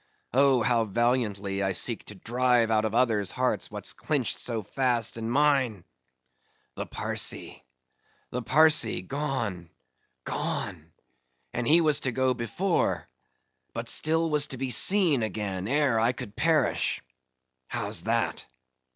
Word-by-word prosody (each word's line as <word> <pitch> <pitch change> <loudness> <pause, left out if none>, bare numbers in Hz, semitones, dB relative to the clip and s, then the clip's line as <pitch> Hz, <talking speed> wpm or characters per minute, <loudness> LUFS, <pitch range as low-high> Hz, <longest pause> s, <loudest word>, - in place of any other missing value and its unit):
Oh! 135 -2 +4
how 120 -2 +2
valiantly 105 -3 -1
I 95 -1 0
seek 115 +5 0
to 105 - -10
drive 120 +2 +1
out 110 0 +2
of 110 0 -2
others' 110 -6 +2
hearts 125 0 -1
what's - - -5
clinched 140 -7 -2
so 115 -3 -2
fast 120 0 0
in 115 0 -4
mine!—The 90 - -3
Parsee—the 65 - -5
Parsee!—gone, 130 - +1 0.5
gone? 85 -5 -4 0.6
and 120 -1 -2
he 165 +3 +5
was 155 -3 +3
to 130 - -2
go 130 +1 +1
before:—but 130 - -1 0.8
still 160 +1 +2
was 150 0 +2
to 130 - -6
be 130 0 -3
seen 170 - +4
again 100 -3 -3
ere 140 -3 +2
I 115 +3 +2
could 115 -6 -9
perish—How's 65 - -2
that? - - -1
120 Hz, 115 wpm, -27 LUFS, 100-135 Hz, 0.8 s, he